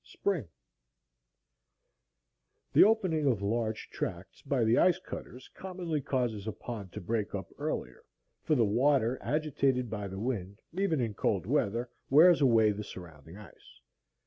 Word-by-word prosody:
Spring 175 - -2 2.3
The - - +8
opening 185 -9 +2
of 115 -7 +1
large 110 +1 -2
tracts - - -5
by 130 -4 0
the 115 +2 +4
ice 180 0 +4
cutters 130 -8 -9
commonly 180 -5 -4
causes 120 -6 -2
a - - -1
pond 105 -5 -7
to - - -5
break 105 +2 -2
up 95 -2 -6
earlier; - - -4 0.4
for 155 - +1
the 120 -4 +3
water, 125 +2 +2
agitated 135 -5 0
by 105 -2 -4
the 95 0 -7
wind, 100 -4 -3
even 180 -6 0
in 115 -3 -1
cold - - 0
weather, 115 +5 0 0.2
wears 165 +4 +7
away 115 -5 +5
the 105 +1 -5
surrounding 85 -3 -11
ice. 105 -5 -15
120 Hz, 145 wpm, -30 LUFS, 105-150 Hz, 2.3 s, The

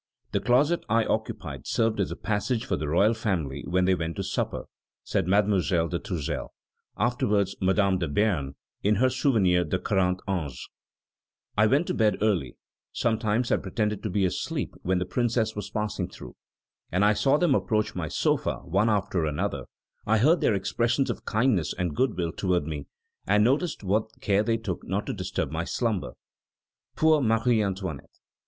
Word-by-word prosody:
"The - - +1
closet 145 +8 +2
I 115 +1 +3
occupied - - -3
served 115 -2 +1
as 100 - +1
a - - -4
passage 110 +3 -1
for 130 - 0
the 75 - -3
royal 100 +9 +3
family 85 -12 -2
when 90 +1 +2
they 95 - +4
went 85 -2 -2
to - - -3
supper," - - -2 0.4
says - - -1
Mademoiselle 95 -4 +2
de 85 - -2
Tourzel, 85 -7 -4 0.5
afterwards 105 -4 +1
Madame 95 0 +2
de 85 - -1
Béarn, 75 -5 0 0.3
in 105 +2 +3
her 130 +5 +3
Souvenirs 105 -10 +2
de 95 - +1
Quarante 90 -2 0
Ans; 80 -10 -3 0.9
"I 110 +1 +4
went 140 +9 +3
to - - -2
bed 110 -1 +2
early; 95 - 0 0.3
sometimes 115 0 0
I - - +4
pretended 105 +1 -2
to 110 - -3
be 95 +1 +1
asleep 90 - -2
when 95 0 +1
the 90 - -1
Princes 115 0 0
were 105 - -3
passing 105 -2 -2
through, - - -11 0.6
and 95 +4 +3
I 105 - +5
saw 135 +6 +3
them 170 -3 +3
approach 110 -4 0
my - - -3
sofa, - - 0
one 100 +6 +2
after 95 -5 0
another; 75 -1 -2 0.4
I 110 +1 +4
heard 155 +10 +4
their 105 - +3
expressions 115 +7 0
of - - -8
kindness 110 -6 +1
and 90 -5 -2
good 130 -6 +1
will 85 -2 -1
toward 90 -3 0
me, 75 -2 -5 0.4
and 105 +2 +4
noticed 140 +4 +1
what 110 +3 -1
care 100 0 +2
they 115 +1 +1
took 105 -6 -5
not - - -2
to - - -3
disturb - - -3
my 80 +1 -2
slumber." 110 -2 -1 0.8
Poor 155 -1 +4
Marie 115 -1 +2
Antoinette! 95 -7 -4
105 Hz, 175 wpm, -27 LUFS, 90-115 Hz, 0.9 s, I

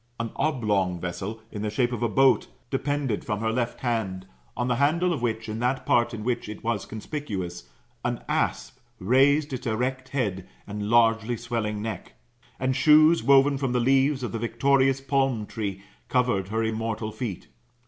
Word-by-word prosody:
An 115 -1 -3
oblong 105 - 0
vessel, 100 +6 -5
in 105 - -5
the 105 - -1
shape 120 +3 0
of 120 - -4
a 120 - +1
boat, 135 +3 +4 0.2
depended 135 -4 -1
from 105 - -2
her 110 0 0
left 120 0 -2
hand, 105 -7 -2 0.3
on 120 - 0
the 120 -1 +1
handle 170 +6 +2
of 140 - -4
which, 110 -2 -2
in 110 +1 -4
that 125 +2 0
part 120 -1 +3
in 110 -2 -6
which 120 -2 -2
it 105 - -8
was 115 -3 -2
conspicuous, 100 - -5 0.3
an - - -2
asp 130 - -1 0.2
raised 135 +8 +3
its 125 0 -4
erect 130 +3 -2
head 100 -9 -2 0.2
and 105 0 -4
largely 115 0 +3
swelling 110 -3 -3
neck. 110 -5 -6 0.5
And 130 0 0
shoes 155 +3 +6
woven 140 0 +4
from 135 -3 -1
the. 125 - +2
leaves 135 +2 +2
of 120 - -3
the 115 - -3
victorious 135 +3 +2
palm 135 -4 0
tree 100 -3 -5 0.3
covered 120 -7 +1
her 110 +2 -1
immortal 110 0 -2
feet. 110 -4 -5
120 Hz, 175 wpm, -26 LUFS, 105-135 Hz, 0.5 s, shoes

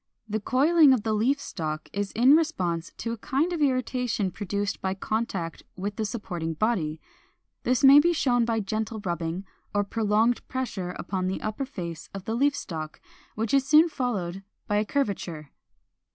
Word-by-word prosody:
The 215 0 -1
coiling 285 +6 +5
of 235 -5 0
the 220 -1 0
leaf 245 +7 +2
stalk 155 - -4
is 200 0 -2
in 255 +6 +6
response 180 - 0
to 230 - -3
a 230 - -4
kind 300 +9 0
of 330 - -2
irritation 250 -6 0
produced 205 +1 -3
by 190 0 -1
contact 195 -5 -3
with 200 +2 -4
the 220 - -2
supporting 175 -7 -4
body. 160 -6 0 0.6
This 255 +3 +1
may 275 +1 +10
be 340 +4 +4
shown 250 -7 +2
by 230 -1 0
gentle 220 +2 -3
rubbing 170 +1 -2 0.3
or 205 - +3
prolonged 220 +3 +1
pressure 215 -9 -3
upon 185 -2 -2
the 190 - -2
upper 215 +6 -3
face 170 - -7
of 195 -1 -7
the 220 - -2
leaf 280 +4 +2
stalk, 155 - -6 0.4
which 220 +2 -2
is 275 -1 +3
soon 310 +4 +6
followed 195 - -2 0.2
by 205 - 0
a 210 - +1
curvature. 185 - -2
215 Hz, 170 wpm, -26 LUFS, 185-255 Hz, 0.6 s, may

